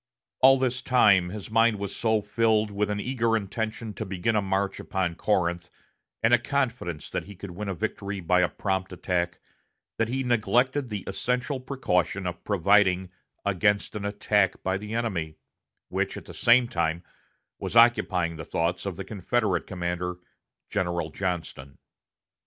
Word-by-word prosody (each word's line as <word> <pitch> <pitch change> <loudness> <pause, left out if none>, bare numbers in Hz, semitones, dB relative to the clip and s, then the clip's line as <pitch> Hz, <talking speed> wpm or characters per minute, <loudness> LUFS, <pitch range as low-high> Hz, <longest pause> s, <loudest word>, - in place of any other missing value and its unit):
All 135 +1 +7
this 130 -1 0
time 100 -8 +4
his 105 +2 -7
mind 115 -1 +4
was 100 -1 -5
so 110 -2 +1
filled 110 0 +2
with 100 +1 -1
an 105 0 -1
eager 115 -1 +1
intention 110 +2 -4
to 110 - -4
begin 95 +3 -1
a 105 - +3
march 95 0 -1
upon 95 -3 -1
Corinth, 85 -2 0 0.5
and 115 +2 +4
a 120 - +7
confidence 120 - -2
that - - -3
he 100 - -11
could 95 +1 -8
win 100 +3 -5
a 95 - -2
victory 100 -1 -3
by 90 +1 +3
a 90 - +2
prompt 95 +2 -2
attack, 90 -1 -2 0.6
that 115 - +2
he 130 +3 -1
neglected 125 +3 +1
the 105 -3 -4
essential 125 +7 -1
precaution 110 -8 -1
of 90 0 -5
providing 95 -1 +3 0.3
against 100 +2 +1
an 105 - -4
attack 100 -1 +1
by 95 0 0
the 105 +3 -5
enemy, 90 -10 -2 0.5
which - - -1
at - - -9
the - - -10
same 120 +1 +4
time 85 -4 -1 0.6
was - - -4
occupying 95 -8 +4
the 80 - -6
thoughts 90 +4 -1
of 95 - -3
the 95 - -5
Confederate 105 0 -1
commander 90 -1 -3 0.5
General 85 -3 -1
Johnston. 85 -8 -4
100 Hz, 160 wpm, -26 LUFS, 90-115 Hz, 0.6 s, All